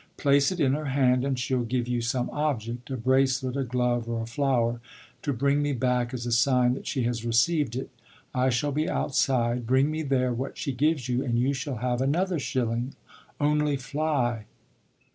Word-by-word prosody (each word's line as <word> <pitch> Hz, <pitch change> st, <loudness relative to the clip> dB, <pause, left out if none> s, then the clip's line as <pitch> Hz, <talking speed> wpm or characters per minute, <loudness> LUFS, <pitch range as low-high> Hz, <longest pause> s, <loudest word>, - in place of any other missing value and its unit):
Place 140 Hz, +2 st, +3 dB
it 185 Hz, -, -4 dB
in 135 Hz, -4 st, +3 dB
her 150 Hz, +2 st, -2 dB
hand 130 Hz, -2 st, +2 dB
and 135 Hz, -1 st, -1 dB
she'll 125 Hz, 0 st, 0 dB
give 120 Hz, +1 st, -1 dB
you 120 Hz, -1 st, -1 dB
some 125 Hz, +1 st, -1 dB
object 125 Hz, -5 st, -2 dB
a 130 Hz, -, -3 dB
bracelet, 130 Hz, +1 st, +1 dB
a 140 Hz, -, 0 dB
glove, 125 Hz, -1 st, -1 dB
or 115 Hz, -1 st, -2 dB
a -, -, -4 dB
flower 120 Hz, -1 st, 0 dB, 0.4 s
to 145 Hz, -, -1 dB
bring 140 Hz, +3 st, +1 dB
me 145 Hz, 0 st, 0 dB
back 125 Hz, -1 st, 0 dB
as 125 Hz, -2 st, -5 dB
a 120 Hz, -, -2 dB
sign 125 Hz, +1 st, +3 dB
that 130 Hz, -, -7 dB
she 130 Hz, -4 st, -1 dB
has 115 Hz, -1 st, -1 dB
received 120 Hz, +3 st, +2 dB
it. 130 Hz, -, -5 dB, 0.4 s
I 130 Hz, 0 st, +2 dB
shall 130 Hz, +4 st, 0 dB
be 150 Hz, +3 st, 0 dB
outside; 120 Hz, -3 st, 0 dB
bring 130 Hz, +4 st, +3 dB
me 155 Hz, +1 st, -2 dB
there 130 Hz, -4 st, +1 dB
what 130 Hz, +3 st, -4 dB
she 140 Hz, -, -2 dB
gives 140 Hz, +1 st, 0 dB
you 125 Hz, +1 st, 0 dB
and 120 Hz, -3 st, 0 dB
you 130 Hz, +4 st, +2 dB
shall 135 Hz, 0 st, -4 dB
have 125 Hz, 0 st, 0 dB
another 170 Hz, +6 st, +1 dB
shilling 120 Hz, -1 st, -2 dB, 0.4 s
only 150 Hz, -1 st, +2 dB
fly!" 130 Hz, -5 st, -1 dB
130 Hz, 195 wpm, -27 LUFS, 120-140 Hz, 0.4 s, Place